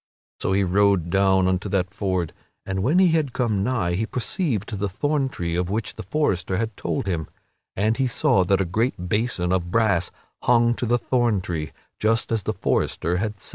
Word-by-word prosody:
So 95 - 0
he 100 +1 +3
rode 95 -2 +2
down 95 -1 +3
unto 95 +2 0
that 95 -1 -1
ford, 95 -5 -1 0.3
and 95 0 -2
when 140 - +2
he 185 -1 +6
had 155 -6 +1
come 110 -6 0
nigh 100 -6 0
he 110 +5 -1
perceived 125 - -2
the 100 0 -1
thorn 145 +7 0
tree 85 -7 -3
of 90 0 -1
which 105 +2 -2
the - - -8
forester 95 - 0
had 110 0 -2
told 85 +1 -2
him, 85 -5 -2 0.5
and 110 +3 +1
he 135 -1 +2
saw 95 -5 +2
that 95 +2 +2
a 95 - +1
great 90 0 -1
basin 105 -5 0
of 90 -2 0
brass 100 -4 +2 0.3
hung 120 -1 +4
to 120 - -3
the 120 +2 +3
thorn 120 -4 +1
tree, 85 -4 -4 0.3
just 115 +2 +1
as 115 -2 +1
the - - -2
forester 90 +1 0
had 105 +1 -3
said. - - -7
100 Hz, 200 wpm, -23 LUFS, 90-115 Hz, 0.5 s, he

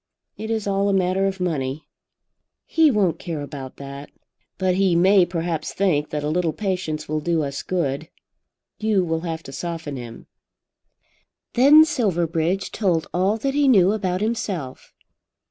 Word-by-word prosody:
It 220 - -6
is 220 -2 -1
all 200 0 +1
a - - +2
matter 190 +1 +1
of 195 0 -3
money." 150 -5 -2 0.8
"He 320 -2 +4
won't 205 - +1
care 165 -4 -4
about 140 -2 -7
that." 140 +1 -8 0.5
"But 185 -1 +1
he 185 -1 +2
may 185 +1 +5
perhaps 165 -2 -3
think 160 -7 +1
that 150 -1 -3
a - - -1
little 165 0 0
patience 180 -7 -3
will 155 +1 -1
do 165 0 0
us 140 0 -4
good. 160 -3 -2 0.7
You 215 -3 +2
will 165 -1 -1
have 165 -1 -4
to - - -9
soften 160 -1 -5
him." 120 -2 -9 1.3
Then 290 +5 +7
Silverbridge 175 - 0
told 175 -7 0
all 190 +4 +1
that 270 +4 -2
he 290 0 +2
knew 195 -7 +5
about 190 -3 -1
himself. 195 - -3
175 Hz, 155 wpm, -22 LUFS, 155-195 Hz, 1.3 s, Then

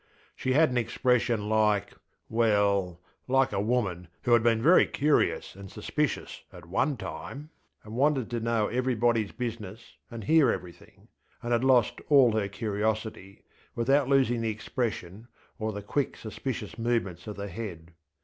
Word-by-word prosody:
She 130 - -1
had 155 0 +4
an 125 - +1
expression 120 -1 +1
likeŌĆöwell, 105 -2 0 0.3
like 135 0 +3
a - - 0
woman 105 -6 -1 0.2
who 120 - +3
had 120 - +6
been 115 -1 +3
very 165 +10 +5
curious 150 -8 +1
and 100 0 -10
suspicious - - -3
at 90 -1 -12
one 130 - 0
time, 135 - -7 0.3
and 105 - -10
wanted 135 -2 +2
to 120 - -1
know 115 -1 +1
everybodyŌĆÖs 120 -3 0
business 115 -3 -6 0.2
and 115 -2 -7
hear 155 +1 +4
everything, 90 -2 -9 0.4
and 120 - -3
had 120 +1 +2
lost 130 -4 +3
all 135 -5 +6
her 110 -2 0
curiosity, 105 -1 -3 0.3
without 135 +3 +2
losing 130 -4 +3
the 115 - 0
expression 110 -2 -4 0.3
or 110 0 -2
the 105 -1 -7
quick 140 +7 -2
suspicious 115 0 -6
movements 115 -7 -1
of 105 - -5
the 100 +1 -5
head. 90 -5 -7
115 Hz, 150 wpm, -28 LUFS, 105-125 Hz, 0.4 s, had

